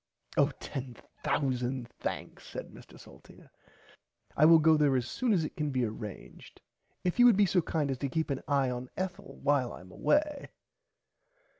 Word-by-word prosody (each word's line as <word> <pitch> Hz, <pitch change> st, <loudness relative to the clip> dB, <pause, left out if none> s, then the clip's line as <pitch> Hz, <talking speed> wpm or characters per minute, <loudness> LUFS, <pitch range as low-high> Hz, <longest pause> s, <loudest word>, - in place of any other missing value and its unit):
Oh -, -, +4 dB
ten 130 Hz, -3 st, -6 dB, 0.3 s
thousand 130 Hz, -2 st, -1 dB
thanks -, -, -6 dB
said -, -, -7 dB
Mr -, -, -14 dB
Salteena -, -, -16 dB, 0.8 s
I 150 Hz, -, +5 dB
will 165 Hz, +1 st, +9 dB
go 160 Hz, 0 st, +5 dB
there 145 Hz, -3 st, +3 dB
as 125 Hz, -1 st, 0 dB
soon 250 Hz, -, -1 dB
as 180 Hz, -6 st, +3 dB
it -, -, -7 dB
can 150 Hz, -1 st, -1 dB
be 130 Hz, -3 st, 0 dB
arranged 105 Hz, -2 st, -9 dB, 0.4 s
if 180 Hz, +5 st, -1 dB
you 245 Hz, -, +9 dB
would 230 Hz, -5 st, +5 dB
be 205 Hz, -, +5 dB
so 180 Hz, -1 st, +2 dB
kind 155 Hz, -3 st, -1 dB
as 130 Hz, -, -4 dB
to 140 Hz, -, -2 dB
keep 160 Hz, +2 st, -1 dB
an 135 Hz, -, -2 dB
eye 140 Hz, -3 st, +2 dB
on 125 Hz, 0 st, -5 dB
Ethel 190 Hz, +1 st, -5 dB
while 140 Hz, -4 st, +2 dB
I -, -, -9 dB
am 90 Hz, 0 st, -15 dB
away. 295 Hz, -, 0 dB
145 Hz, 180 wpm, -30 LUFS, 125-175 Hz, 0.8 s, will